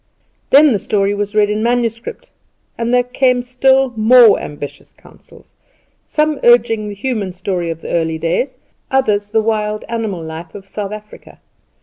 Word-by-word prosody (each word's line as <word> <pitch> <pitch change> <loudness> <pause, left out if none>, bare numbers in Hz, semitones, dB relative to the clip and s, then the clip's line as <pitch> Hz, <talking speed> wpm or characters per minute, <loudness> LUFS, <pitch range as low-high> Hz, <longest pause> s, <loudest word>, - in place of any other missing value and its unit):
Then 290 +1 +6
the 210 - +1
story 200 0 0
was 205 +1 -4
read 210 -1 +3
in 210 +1 -1
manuscript 235 - -2 0.4
and 235 0 -2
there 245 0 +3 0.3
were 245 - -2
still 265 +1 +2
more 225 0 +6
ambitious 145 -1 -9
counsels, - - -20 0.5
some 305 -1 0
urging 230 -3 +3
the 205 - -7
human 205 -4 -3
story 180 -2 -3
of 165 0 -5
the - - -7
early 160 -1 0
days, 170 - -2 0.3
others 215 -7 +1
of 205 - -25
the 220 -1 +2
wild 215 -1 -2
animal 220 -7 -3
life 160 +1 -8
of 195 -1 -10
South 200 0 -5
Africa. 210 0 -11
215 Hz, 160 wpm, -16 LUFS, 195-245 Hz, 0.5 s, Then